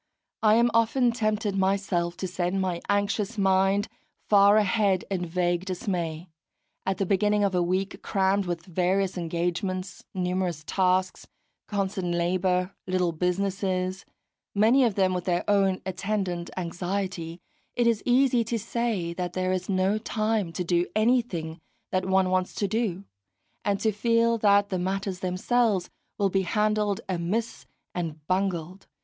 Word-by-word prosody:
I 215 -1 +5
am 235 +1 +4
often 230 +2 +3
tempted 215 -3 -1
myself 190 -3 0
to 190 - -3
send 180 +1 -1
my 180 -2 -1
anxious 205 +2 0
mind 195 +1 +2 0.4
far 200 0 +6
ahead 200 -2 +2
in 180 -2 -1
vague 175 +1 0
dismay; 175 -3 -3 0.6
at 190 - 0
the 195 - 0
beginning 205 +2 +2
of 200 -1 +1
a 180 - +2
week 185 +3 -1
crammed 195 0 +1
with 170 -1 -3
various 185 +2 0
engagements, 180 +2 -3
numerous 180 -3 -1
tasks, 185 +1 0 0.4
constant 190 -3 -1
labour, 180 +1 +1 0.2
little 185 -2 +1
businesses, 185 +2 -1 0.5
many 225 +6 +5
of 230 -5 +1
them 190 -2 +2
with 180 -1 -3
their 175 -1 0
own 195 -2 +2
attendant 190 -2 -2
anxiety, 175 -1 -3 0.4
it 240 - +2
is 230 -2 +2
easy 250 -1 +3
to 230 +1 -1
say 220 -6 -2
that 180 0 -4
there 185 0 0
is 185 0 -2
no 190 +2 +1
time 215 -4 -1
to 180 - -2
do 175 0 +1
anything 215 -9 0 0.3
that 185 0 0
one 190 -1 +2
wants 185 0 0
to 200 - 0
do, 200 -3 -1 0.6
and 200 -1 0
to 220 - +2
feel 230 +2 +2
that 205 -1 +4
the 185 - -1
matters 190 0 -2
themselves 190 +2 0 0.3
will 200 -1 +2
be 195 - +2
handled 210 +1 0
amiss 190 +6 -2 0.3
and 160 -4 -5
bungled. 185 0 -2
190 Hz, 145 wpm, -26 LUFS, 180-205 Hz, 0.6 s, far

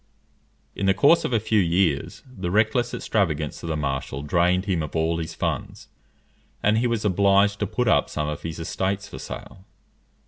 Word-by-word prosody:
In 95 - -1
the 95 - +4
course 155 - +5
of - - -2
a 115 - +3
few 110 0 +1
years, 85 -5 0
the 100 -9 -5
reckless 110 +5 +2
extravagance 80 -8 -1
of 85 - -6
the 80 - -1
marshal 70 -1 -3
drained 90 +4 +2
him 90 -5 0
of 75 +1 -6
all 80 +1 +1
his 80 0 -5
funds, - - -4 0.7
and 105 +2 +3
he 120 - +1
was 115 -3 -1
obliged 100 +1 +3
to 105 - -1
put 125 +5 -1
up - - +3
some 75 -1 -2
of 75 -1 -4
his 80 -1 -5
estates 95 +4 -2
for - - -9
sale. 95 - -9
95 Hz, 185 wpm, -24 LUFS, 80-105 Hz, 0.7 s, course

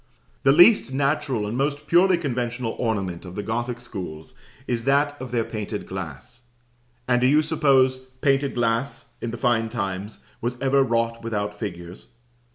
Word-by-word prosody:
The 135 - +5
least 175 - +6
natural 135 -4 0
and 105 +3 -3
most 145 +2 -1
purely 180 +2 +4
conventional 120 -6 -2
ornament 100 -7 -2
of 90 -1 -9
the 105 - -3
Gothic 120 +2 -2
schools 90 -10 -8 0.3
is 120 -2 -2
that 145 +1 +2
of 130 -1 -6
their 120 -2 +1
painted 105 -1 -5
glass; 95 - -8 0.7
and 125 -1 +3
do 125 - +4
you 150 +3 +4
suppose 135 -4 +3 0.2
painted 140 0 +2
glass, 115 +1 -1
in 120 - -3
the 120 - -5
fine 115 -3 +1
times, 100 -2 -4 0.2
was 120 +1 -2
ever 135 +1 +3
wrought 115 -2 0
without 105 -2 -2
figures? 90 -4 -7
120 Hz, 160 wpm, -24 LUFS, 105-135 Hz, 0.7 s, least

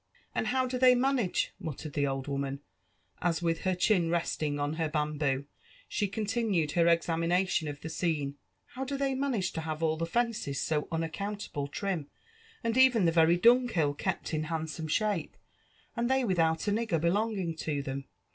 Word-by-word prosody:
" - - -36
And - - -1
how 260 0 +2
do 250 0 -2
they 255 -1 +7
manage,'' 250 -6 +1
muttered 155 -1 -6
the 145 -1 +1
old 135 -1 -2
wooMn, 140 -1 -2 0.6
as 175 0 0
with 165 -1 +1
her 185 -1 +2
chin 180 -2 +2
resting 155 -3 -1
on 145 +1 -1
her 160 -2 0
bamboo 150 -3 0 0.4
she 205 - 0
eentinued 205 -6 0
her 170 +1 +3
examination 170 +1 +2
of 145 -1 -6
the - - -5
aoene,* 160 -3 -1
^'^ - - -9 0.4
how 260 - -5
do 275 +1 -3
they 275 -1 0
manage 260 -9 0
to 160 - -4
have 160 0 -4
all 160 -1 +2
the 165 +1 -2
fences 225 - -1
so 150 -2 0
unaccountable 165 -1 -3
trim, 170 -1 -3 0.5
and 230 +1 0
even 250 -7 +6
the 165 - +4
very 165 +1 +5
dunghill 230 - +4
kept 145 - -3
in 155 0 0
handsome 160 0 -3
shape, 200 -1 -1 0.6
and 235 +1 0
they 265 -1 +2
without 165 -3 +1
a - - +3
nigger 220 -5 0
belonging 190 0 0
to 145 -3 -2
them 135 0 -4
170 Hz, 180 wpm, -30 LUFS, 155-215 Hz, 0.6 s, they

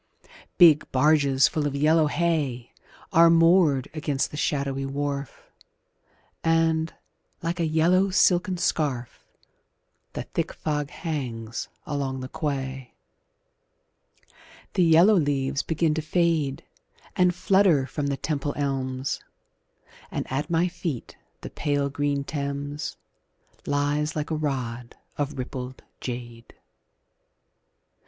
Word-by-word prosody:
Big 165 -5 +6
barges 140 -1 +4
full 150 -2 -1
of 140 - -4
yellow 155 +2 +4
hay 145 -7 -1 0.4
Are 165 +1 +7
moored 165 -5 +4
against 150 -3 -1
the - - -7
shadowy 140 -2 -1
wharf, 140 -1 -4 0.9
And, 165 0 +2 0.5
like 170 +2 -2
a 165 - +1
yellow 175 +5 +3
silken 185 0 +3
scarf, 140 -8 -1 0.9
The - - -4
thick - - -3
fog 150 -2 -2
hangs 125 -10 -5 0.2
along 135 -2 -2
the 130 - -5
quay. 135 -4 -4 1.8
The - - +1
yellow 170 +5 +6
leaves 140 -5 +1
begin 160 -1 0
to 160 - -1
fade 155 -4 0 0.5
And 180 -1 +3
flutter 185 -7 +3
from 145 +1 -3
the 140 -1 -1
Temple 145 0 -2
elms, 135 -2 -2 0.9
And - - -3
at 145 +4 -2
my 170 +1 +2
feet 170 -7 -5 0.3
the - - -8
pale 145 -1 -1
green 145 0 -1
Thames 145 +1 -4 0.7
Lies 145 +2 0
like 150 +1 -3
a - - +1
rod 125 -6 -3 0.2
of 145 0 -2
rippled 130 0 -6 0.2
jade. 120 -2 -7
145 Hz, 110 wpm, -25 LUFS, 135-160 Hz, 1.8 s, Are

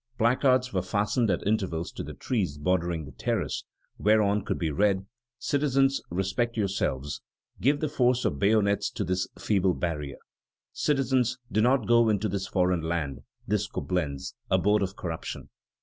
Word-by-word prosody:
Placards 130 +1 +3
were 95 - +1
fastened 105 +5 0
at 85 - 0
intervals 95 -6 -1
to - - -6
the - - -7
trees 95 - -1
bordering 85 0 0
the - - -10
terrace, - - -2 0.3
whereon 105 -1 +3
could - - -2
be 80 -3 -1
read: 95 +3 +2 0.3
"Citizens, 135 -1 +2
respect 95 +7 -1
yourselves; 75 -9 -1 0.4
give 145 +3 +2
the 155 - +1
force 125 -3 +2
of 70 - 0
bayonets 100 0 +3
to - - -3
this 95 +1 -1
feeble 95 -3 +1
barrier. 75 -5 -3 0.6
Citizens, 130 -4 +1
do 110 - +2
not 125 0 +3
go 115 -1 +5
into 105 0 +1
this 95 -1 -3
foreign 90 -2 +1
land, 80 -5 -2 0.3
this 105 0 0
Coblentz, 75 -7 -3 0.2
abode 105 +1 +3
of 95 0 -2
corruption." 80 -3 -5
100 Hz, 150 wpm, -27 LUFS, 90-120 Hz, 0.6 s, go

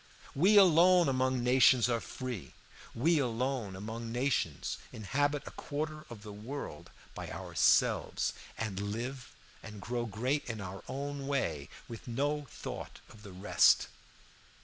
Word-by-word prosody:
We 190 +9 +5
alone 180 -1 +7
among 130 -1 +1
nations 125 -1 +5
are 120 -1 +1
free, 125 -4 -6 0.4
we 155 +7 +3
alone 125 -4 -1
among 115 +4 -6
nations 120 - -1
inhabit 145 +7 -1
a - - -7
quarter 155 +1 -5
of 110 -3 -10
the 105 -1 -8
world 120 +8 -7 0.2
by - - -7
ourselves, - - +2 0.2
and 105 -4 -3
live 120 +6 -4 0.3
and 105 -2 -9
grow 120 +4 -3
great 125 +8 -1
in 115 -2 -5
our 95 -1 -6
own 140 0 -4
way 85 - -1 0.2
with 115 0 -9
no 145 +4 -1
thought - - -7
of 110 - -15
the 100 -2 -10
rest. 95 +3 +4
125 Hz, 135 wpm, -32 LUFS, 110-140 Hz, 0.4 s, alone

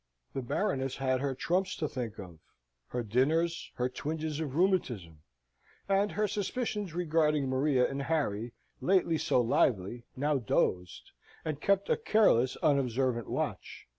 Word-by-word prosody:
The 135 - -2
Baroness 135 - -1
had 130 -1 0
her 135 -2 -1
trumps 185 +6 0
to 155 - -2
think 120 -6 -5
of, 90 -5 -10 0.5
her 125 -1 -3
dinners, 155 +10 +1
her 125 - 0
twinges 155 +3 -4
of 145 -4 -3
rheumatism: 120 - 0 0.7
and 200 +1 +2
her 210 +1 +1
suspicions 205 -3 -3
regarding 155 -4 +2
Maria 130 -1 +2
and 140 0 -4
Harry, 120 -7 -1 0.3
lately 180 -4 +2
so 125 - +2
lively, 120 -1 +1
now 145 +1 +1
dozed, 90 -5 -1 0.3
and 150 -2 -3
kept 200 0 +2
a 470 - +2
careless, 210 - +3
unobservant 130 -4 +1
watch. - - -4
140 Hz, 135 wpm, -31 LUFS, 125-170 Hz, 0.7 s, careless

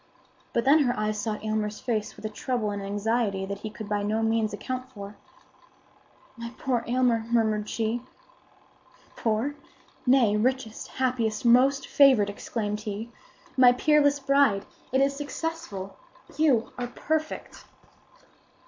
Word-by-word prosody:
But 235 - 0
then 290 +4 +6
her 250 -5 +1
eyes 215 0 -1
sought 210 +1 -3
Aylmer's 215 -1 -1
face 220 -4 -2
with - - -11
a - - -1
trouble 215 0 -2
and 200 0 -4
anxiety 205 0 -1
that 200 +1 -5
he 215 - -5
could 215 0 -8
by 205 0 -1
no 215 +2 0
means 225 -1 +1
account 255 +4 -5
for. 200 -2 -9 1.2
"My 235 -1 -7
poor 245 -3 0
Aylmer!" 240 -2 +2
murmured 220 -3 +1
she. 225 +1 -1 1.1
"Poor? 225 +5 0 0.5
Nay, 250 -5 +5
richest, 235 0 -1
happiest, 245 -4 -1
most 265 +3 +5
favored!" 255 -8 +5
exclaimed 210 0 -3
he. 215 +2 -5 0.4
"My 250 -1 +7
peerless 285 +1 +3
bride, 275 -8 +3 0.3
it 265 +1 +3
is 275 0 +2
successful! 290 - -5 0.4
You 280 -7 +2
are 245 - -2
perfect!" 310 +5 -3
230 Hz, 135 wpm, -27 LUFS, 210-260 Hz, 1.2 s, My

